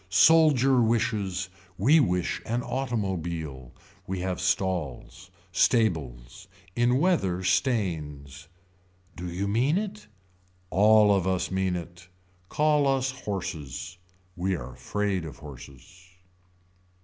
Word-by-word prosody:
Soldier 135 - +5
wishes. 105 -5 0 0.3
We 140 - +5
wish 90 - 0
an 120 +2 -1
automobile. 85 - -3 0.4
We 95 -1 -3
have 90 -1 -3
stalls. 90 -6 -2 0.2
Stables. 80 - 0 0.3
In 120 +1 +3
weather 115 - +1
stains. 80 - -1 0.7
Do 90 0 -6
you 95 +3 -2
mean 125 - +2
it. 190 - -5 0.6
All 105 +1 +5
of 95 -2 +1
us 95 -1 -1
mean 95 -1 0
it. 85 +1 -8 0.4
Call 150 -1 +2
us 135 -1 +1
horses. 90 - -6 0.4
We 95 +1 -1
are 65 -5 -7
afraid 100 +7 -2
of 80 -3 -8
horses. 75 +5 -13
95 Hz, 105 wpm, -27 LUFS, 85-120 Hz, 0.7 s, Soldier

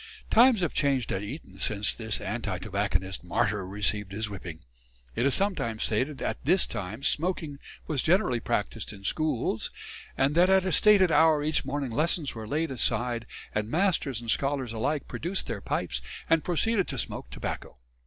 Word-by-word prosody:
Times 235 -2 +6
have 175 - 0
changed 135 -5 +1
at 95 - -1
Eton 100 - -8
since 105 +1 +1
this 110 -2 -2
anti - - -3
tobacconist 95 +2 -2
martyr 95 +2 0
received 105 0 -1
his 110 +1 -3
whipping. 85 -4 -7 0.5
It 125 - +2
is 140 - +4
sometimes 185 - 0
stated 130 +7 0
that - - -4
at - - -4
this 185 - +4
time 105 +7 -6
smoking 155 -3 0 0.3
was 145 -5 -1
generally 170 - +2
practised 60 - -2
in 100 -1 -12
schools, 130 -2 -1 0.5
and 135 +2 +2
that 175 +3 +5
at 190 -1 +4
a 185 - 0
stated 195 -1 +6
hour 160 -2 +5
each 155 -1 0
morning 140 -2 -2
lessons 155 +3 0
were 110 -2 -7
laid 155 +4 -1
aside, 120 -2 0 0.3
and 105 0 -1
masters 160 - +1
and 115 -1 -2
scholars 135 -4 -1
alike 140 +7 -1
produced 180 +4 -3
their 100 - -4
pipes 65 -8 -2 0.3
and 165 -1 +3
proceeded 195 +3 +1
to - - -4
smoke - - -3
tobacco. - - -6
135 Hz, 175 wpm, -28 LUFS, 105-165 Hz, 0.5 s, Times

